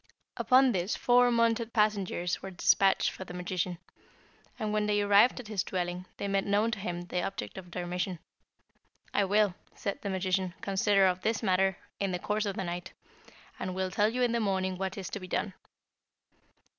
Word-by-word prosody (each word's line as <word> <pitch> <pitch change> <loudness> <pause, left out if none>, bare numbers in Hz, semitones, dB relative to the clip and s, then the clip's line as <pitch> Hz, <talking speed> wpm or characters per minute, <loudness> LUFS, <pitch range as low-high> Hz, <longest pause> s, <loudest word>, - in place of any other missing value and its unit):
"Upon 260 0 +5
this 185 -1 -1
four 245 0 +4
mounted 230 -1 +2
messengers 200 -5 +1
were 195 - -6
despatched 190 +1 +3
for - - -8
the 180 -1 -9
magician, 180 0 -2 0.8
and 215 -1 -2
when 210 0 +1
they 205 0 +2
arrived 205 +5 +5
at 245 - -8
his 210 -4 -1
dwelling, 180 -1 -3
they 200 - -3
made 195 0 0
known 210 +3 +2
to 215 - -3
him 175 -3 -3
the 180 0 -2
object 195 +2 -4
of 185 -2 -9
their 175 0 -4
mission. 180 +1 -2 1.0
'I 200 - +3
will,' 205 -1 +2 0.2
said 200 - -4
the 200 - -3
magician, 185 -1 -1
'consider 195 0 +3
of 185 0 +1
this 225 +2 -1
matter 190 -1 +2 0.2
in 195 -1 0
the 180 - -1
course 210 +3 -1
of 195 - -2
the - - -2
night, 175 +1 -5 0.7
and 185 -1 -3
will 190 0 -1
tell 210 +3 +3
you 250 +2 0
in 240 - +2
the 235 - +1
morning 190 -3 0
what 190 +2 -4
is 190 - -5
to - - -4
be 185 - -8
done.' 190 +2 -2
195 Hz, 195 wpm, -30 LUFS, 185-210 Hz, 1.0 s, Upon